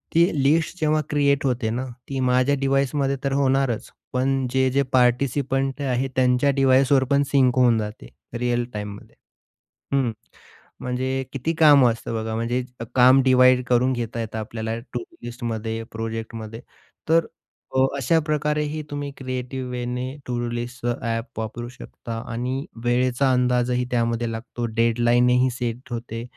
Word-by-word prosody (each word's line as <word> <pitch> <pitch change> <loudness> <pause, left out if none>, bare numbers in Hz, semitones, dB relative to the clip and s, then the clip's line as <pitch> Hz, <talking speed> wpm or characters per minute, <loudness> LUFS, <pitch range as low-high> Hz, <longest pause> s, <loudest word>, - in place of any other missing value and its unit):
ती 170 +1 +6 0.2
लिस्ट 160 +5 +2
जेव्हा 155 0 +2
क्रिएट 140 -1 +2
होते 125 -3 0
ना, 125 +4 -2 0.2
ती 135 -1 -3
माझ्या 130 +2 +3
डिव्हाइसमध्ये 135 0 +1
तर 140 -1 0
होणारच 135 -3 +1 0.2
पण 130 +1 +1
जे-जे 130 +1 +2
पार्टिसिपंट 135 +2 +1
आहेत 135 -1 0
त्यांच्या 125 +2 +3
डिव्हाइसवर 135 0 +4
पण 140 0 +4
सिंक 130 -3 +4
होऊन 120 -3 +5
जाते 105 - -6 0.3
रिअल 120 0 +1
टाईममध्ये 105 -1 -7 0.8
हं. 130 -4 +1 0.7
म्हणजे 130 +1 -2
किती 140 +5 -1
कामं 145 -6 +6
असतं 115 - -7
बघा, 110 0 -3
म्हणजे 120 +3 -1 0.3
काम 130 +1 +7
डिव्हाईड 130 -1 +5
करून 125 +1 +3
घेता 120 -1 -4
येतं 110 0 -5
आपल्याला, 110 +1 -4
टूडू 120 0 -8
लिस्टमध्ये, 115 -2 -4
प्रोजेक्टमध्ये. 115 0 -6 0.5
तर 165 0 +4 0.5
अ, 130 - +6
अशाप्रकारेही 150 +1 0
तुम्ही 145 -1 -4
क्रिएटिव्ह 130 0 -4
वेने 125 0 -3 0.2
टूडू 120 -1 -2
लिस्टचं 120 0 -3
ॲप 115 0 -3
वापरू 120 +2 -5
शकता 120 -2 -8
आणि 125 +4 -3 0.2
वेळेचा 125 +2 +2
अंदाजही 125 0 +1
त्यामध्ये 115 -1 0
लागतो, 120 +1 -5
डेडलाईनही 120 +2 +3
सेट 120 +1 -5
होते, 115 -1 -5
125 Hz, 130 wpm, -23 LUFS, 120-135 Hz, 0.8 s, काम